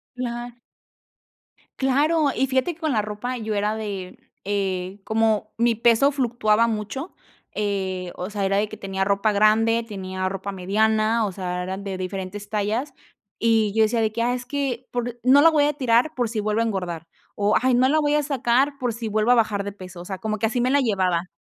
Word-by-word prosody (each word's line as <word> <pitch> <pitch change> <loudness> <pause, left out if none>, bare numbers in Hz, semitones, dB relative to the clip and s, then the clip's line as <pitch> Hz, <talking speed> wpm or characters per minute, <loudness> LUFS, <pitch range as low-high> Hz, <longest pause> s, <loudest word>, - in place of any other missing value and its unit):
Claro. 240 -1 -5 1.2
Claro, 295 +4 +2
y 270 - +1
fíjate 260 +6 0
que 335 - -22
con 315 -1 0
la 220 -4 +2
ropa 215 +5 -4
yo 220 -2 -3
era 210 +1 0
de, 200 -4 -6 0.2
eh, 190 -1 -2
como 220 -1 +1
mi 235 0 +2
peso 235 +5 +4
fluctuaba 235 -4 +2
mucho, 225 - -4 0.4
eh, 190 -3 -2
o 180 - -4
sea, 205 -1 -3
era 195 0 +1
de 210 +1 +1
que 215 - -9
tenía 195 -2 -3
ropa 200 +2 +2
grande, 225 +2 +3
tenía 185 -2 -4
ropa 195 +1 -4
mediana, 215 +4 +1
o 200 - -3
sea, 180 -1 -4
eran 190 +2 -5
de 195 -1 -4
diferentes 190 +2 -5
tallas 215 +6 -1 0.5
y 225 -2 +3
yo 220 0 +4
decía 225 +1 +1
de 220 -1 +1
que: 230 +2 -3
"Ah, 240 +1 +1
es 250 0 -4
que, 260 -2 -3
por 245 -1 -3
no 265 +3 +6
la 330 - +8
voy 305 -2 +3
a 295 - +3
tirar 255 +2 +2
por 245 -2 0
si 220 -1 -3
vuelvo 215 +1 0
a 230 - +2
engordar" 180 -6 -3 0.3
o, 205 +1 +2
"Ay, 255 0 +3
no 255 +2 +4
la 310 +3 +3
voy 295 0 +2
a 300 - +2
sacar 270 0 +1
por 250 -3 -1
si 230 0 -5
vuelvo 215 +2 +2
a - - +7
bajar 215 -3 +1
de 200 - -5
peso", 185 -3 -10
o - - -10
sea, 190 0 -5
como 215 +1 -3
que 220 - +1
así 230 +3 -2
me 250 +2 +2
la 285 +1 +4
llevaba. 185 -7 0
220 Hz, 215 wpm, -23 LUFS, 200-245 Hz, 1.2 s, la